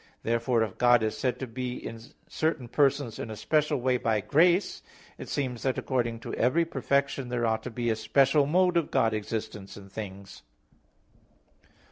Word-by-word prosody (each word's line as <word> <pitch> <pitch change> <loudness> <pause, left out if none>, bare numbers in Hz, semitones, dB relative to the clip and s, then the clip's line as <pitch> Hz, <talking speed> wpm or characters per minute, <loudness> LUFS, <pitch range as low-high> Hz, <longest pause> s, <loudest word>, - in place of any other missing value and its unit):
Therefore 115 0 +1
if 105 -4 -6
God 120 -2 +5
is 110 - -1
said 125 -2 -1
to 130 - -4
be 125 +1 -4
in 115 - -7 0.3
certain 155 -5 -1
persons 140 -2 +1
in 110 - -5
a 110 - -5
special 150 +4 +1
way 125 0 +1
by 110 -3 0
grace, 170 - +2 0.4
it - - -8
seems 130 -5 -2
that 130 -1 0
according 120 -3 -1
to - - -6
every 155 +8 +2
perfection 140 -3 -1
there 120 -1 -1
ought 110 -1 0
to 125 - -6
be 120 -1 -1
a - - +1
special 135 +6 +3
mode 180 +3 +3
of 165 - 0
God's 110 -1 +2
existence 105 -2 -6
in 100 -1 -12
things. 100 -1 -8
125 Hz, 175 wpm, -28 LUFS, 110-140 Hz, 0.4 s, God